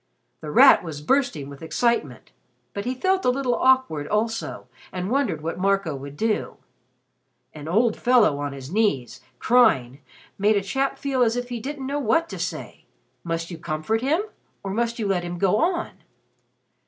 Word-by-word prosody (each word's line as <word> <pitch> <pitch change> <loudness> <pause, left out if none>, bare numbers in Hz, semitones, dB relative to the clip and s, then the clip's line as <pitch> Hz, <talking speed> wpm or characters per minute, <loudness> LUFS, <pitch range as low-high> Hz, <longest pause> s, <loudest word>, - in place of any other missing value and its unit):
The 155 - -7
Rat 150 - +7
was 160 -4 -6
bursting 155 - 0
with 140 -1 -11
excitement, 160 - -1 0.4
but 200 - -5
he 255 +1 -2
felt 375 +7 +1
a - - +3
little 255 -1 0
awkward 260 - +2
also 225 +2 -2 0.3
and 185 +3 -4
wondered 255 - 0
what 165 +3 -4
Marco 195 -4 +1
would 140 +1 -9
do. 220 +2 -1 1.0
An 150 -1 -9
old 215 +6 +2
fellow 235 - +3
on 145 0 -3
his 135 +1 -9
knees, 185 - 0 0.2
crying, 145 - +3 0.4
made 210 +1 +3
a 200 - -1
chap 270 +7 -1
feel 270 -2 -1
as 230 -1 +3
if 245 0 -4
he 240 -1 -4
didn't 275 +3 -6
know 280 +2 -2
what 290 +7 +1
to - - -7
say. - - -6 0.4
Must 165 0 -3
you 165 - -7
comfort 155 +10 -2
him 310 +9 +1 0.4
or 195 - -4
must 235 +3 -1
you 220 - -2
let 190 -2 +1
him 175 0 -5
go 195 +3 +2
on? 345 +4 0
210 Hz, 175 wpm, -24 LUFS, 160-250 Hz, 1.0 s, Rat